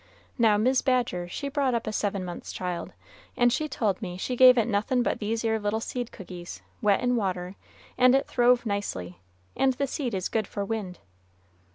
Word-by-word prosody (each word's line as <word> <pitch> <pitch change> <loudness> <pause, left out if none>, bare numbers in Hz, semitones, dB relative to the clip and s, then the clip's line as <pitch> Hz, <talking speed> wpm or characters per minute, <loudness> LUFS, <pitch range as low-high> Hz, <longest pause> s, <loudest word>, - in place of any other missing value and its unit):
Now, 220 -3 +5
Mis' 255 +5 +3
Badger 245 -9 0
she 280 +10 -5
brought 275 -3 0
up 230 - -2
a 215 - -3
seven 200 -3 -1
months' 175 -1 -7
child, 180 -2 -4 0.5
and 245 -1 +4
she 305 +3 -1
told 210 -8 -1
me 180 -4 -5
she 250 +7 -3
gave 255 0 +8
it 230 - +3
nothin' 235 +3 +1
but - - -1
these 225 +2 -2
'ere 220 0 +1
little 205 +1 -1
seed 245 +1 -4
cookies, 180 -4 -9 0.2
wet 205 -3 +3
in 245 0 +1
water, 185 -4 -2 0.4
and 255 +1 +6
it 275 - +2
throve 245 0 +3
nicely, 95 - -3 0.4
and 265 -1 +3
the 280 +3 -1
seed 255 -5 -3
is 185 -1 -1
good 220 -3 -1
for 200 - -4
wind." 200 -4 -4
220 Hz, 195 wpm, -27 LUFS, 195-250 Hz, 0.5 s, gave